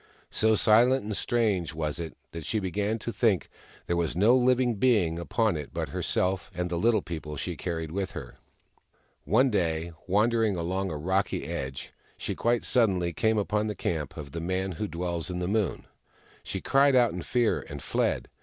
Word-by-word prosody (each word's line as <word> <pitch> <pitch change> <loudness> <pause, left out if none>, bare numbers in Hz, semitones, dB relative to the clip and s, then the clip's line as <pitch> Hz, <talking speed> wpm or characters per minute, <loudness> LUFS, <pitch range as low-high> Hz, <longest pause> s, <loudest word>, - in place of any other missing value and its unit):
So 110 0 +3
silent 120 +5 +4
and 105 0 -3
strange 100 -10 0
was 75 0 -2
it 80 -2 -6
that 85 -1 -6
she 110 - -1
began 105 +3 -1
to 115 +1 -5
think 105 -8 +1 0.4
there 85 - 0
was 85 -2 0
no 105 +8 +5
living 125 -2 +3
being 100 -9 +2
upon 110 +3 +1
it 75 -2 -6
but - - -2
herself 95 +1 -1
and 90 0 -2
the - - 0
Little 110 0 +3
People 75 -3 -6
she - - -3
carried 80 -3 -4
with 95 +2 -3
her. 65 -5 -8 0.9
One 125 +5 +4
day, 85 -4 0 0.2
wandering 110 +2 +2
along 95 +3 -2
a 80 - -4
rocky 95 +6 0
edge, 65 0 -5 0.2
she - - -3
quite 120 0 +1
suddenly 95 -8 +2
came 110 +7 +1
upon 105 +1 0
the 105 - -3
camp 80 -5 -3
of 70 -3 -7
the 85 - -4
Man 95 +2 -1
Who 105 +5 -3
Dwells 85 -1 -3
In 90 - -3
The 90 0 -2
Moon. 105 -2 0 0.6
She 95 - -5
cried 140 0 +4
out 120 -6 +4
in 90 - -4
fear, 120 +4 +1
and 75 - -6
fled. 65 - -1
95 Hz, 185 wpm, -28 LUFS, 85-110 Hz, 0.9 s, no